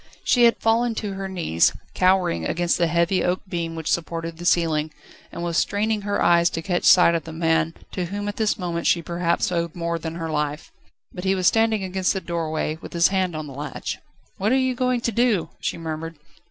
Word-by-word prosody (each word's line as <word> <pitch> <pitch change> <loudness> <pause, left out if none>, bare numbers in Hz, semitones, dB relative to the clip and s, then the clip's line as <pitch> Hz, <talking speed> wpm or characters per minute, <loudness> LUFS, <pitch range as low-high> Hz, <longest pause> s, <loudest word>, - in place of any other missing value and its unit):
She 245 -2 +4
had 235 - +4
fallen 225 +1 +1
on 205 -2 -3
her 195 0 -5
knees, 165 - +2 0.2
cowering 185 - +2
against 175 - 0
the 170 - +3
heavy 170 +3 +1
oak 180 +1 0
beam 170 -2 -3
which 160 -1 -6
supported 165 0 -2
the 175 - -7
ceiling, 160 -3 +2 0.4
and 170 - -6
was 170 -1 -1
straining 210 +1 0
her 205 0 -1
eyes 170 0 +4
to 165 - -5
catch 175 0 -1
sight 180 -2 +7
of 165 - -1
the 165 - -7
man, 165 0 +1 0.2
to 180 - -3
whom 205 +3 -4
at 205 - -4
this 220 -1 +1
moment 170 -3 -2
she 170 - +2
perhaps 170 +1 0
owed 170 -2 -2
more 170 -1 -2
than 160 0 -5
her 165 -1 -4
life: 150 0 -3 0.4
but 180 - -7
he 190 0 +2
was 185 -1 -2
standing 225 -1 +3
against 190 0 0
the 190 - -2
doorway, 160 -3 -3
with - - -10
his 170 -1 +4
hand 185 -3 0
on 155 0 -4
the 140 - -9
latch. 145 +2 -5 0.4
"What 205 +4 +1
are 260 - +4
you 260 -1 +1
going 250 -1 0
to 235 - -1
do?" 230 -5 +1
she - - -3
murmured. 165 0 -5
175 Hz, 220 wpm, -23 LUFS, 165-195 Hz, 0.4 s, sight